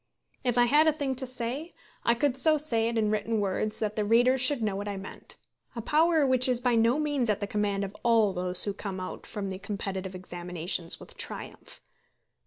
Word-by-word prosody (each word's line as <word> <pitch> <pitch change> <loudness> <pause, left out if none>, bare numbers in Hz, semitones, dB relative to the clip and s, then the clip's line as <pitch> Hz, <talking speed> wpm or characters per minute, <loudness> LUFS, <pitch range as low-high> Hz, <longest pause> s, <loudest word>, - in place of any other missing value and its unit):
If 245 -2 0
I 245 - +6
had 295 +6 +4
a 315 - +4
thing 285 -3 -2
to 260 - -4
say, 255 +7 -4 0.3
I 235 - +3
could 260 +1 +1
so 310 +3 +4
say 230 -7 0
it 230 0 -2
in 215 -1 +1
written 215 +1 -1
words 205 +2 -1
that 215 -1 -2
the 215 - 0
readers 245 +4 +3
should 255 -2 +3
know 205 -2 -1
what 205 +1 -4
I 200 -1 -4
meant, 195 0 -8 0.4
a 230 - -4
power 315 +2 +3
which 255 -1 +4
is 250 -2 +2
by 245 -1 +1
no 230 +3 +3
means 290 -6 0
at 210 -1 +1
the 205 - -2
command 200 -1 -1
of 200 +1 -6
all 225 -4 +3
those 180 0 +4
who 205 - -2
come 195 -1 -6
out 185 - -7
from 205 -3 -5
these 190 +1 -7
competitive 195 -2 -5
examinations 175 -1 -3
with - - -13
triumph. - - -8
225 Hz, 215 wpm, -28 LUFS, 200-255 Hz, 0.4 s, I